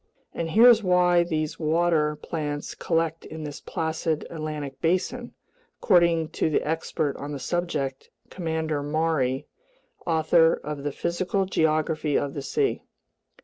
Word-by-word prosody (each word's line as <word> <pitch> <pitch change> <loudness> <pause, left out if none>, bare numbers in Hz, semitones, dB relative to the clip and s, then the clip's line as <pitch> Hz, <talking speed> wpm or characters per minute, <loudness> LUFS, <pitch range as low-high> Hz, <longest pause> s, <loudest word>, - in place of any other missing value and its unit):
And 165 -1 -3
here's 230 +4 +7
why 180 -2 +4
these 155 -3 -2
water 160 -1 +2
plants 150 -1 -4
collect 165 -1 -1
in 160 0 -8
this 145 -1 -7
placid 160 -1 -2
Atlantic 150 -4 -5
basin, 185 +8 -1 0.4
according 170 -3 +3
to - - 0
the 150 - 0
expert 160 -2 -1
on 145 +1 -6
the 140 - -5
subject, 145 -6 -3 0.2
Commander 160 -4 -2
Maury, 145 -3 0 0.6
author 165 0 +4
of 150 -1 -5
The 145 +1 -2
Physical 180 +5 -1
Geography 155 -3 +1
of 140 -1 -2
the 140 - -4
Sea. 410 - 0
160 Hz, 130 wpm, -25 LUFS, 150-170 Hz, 0.6 s, here's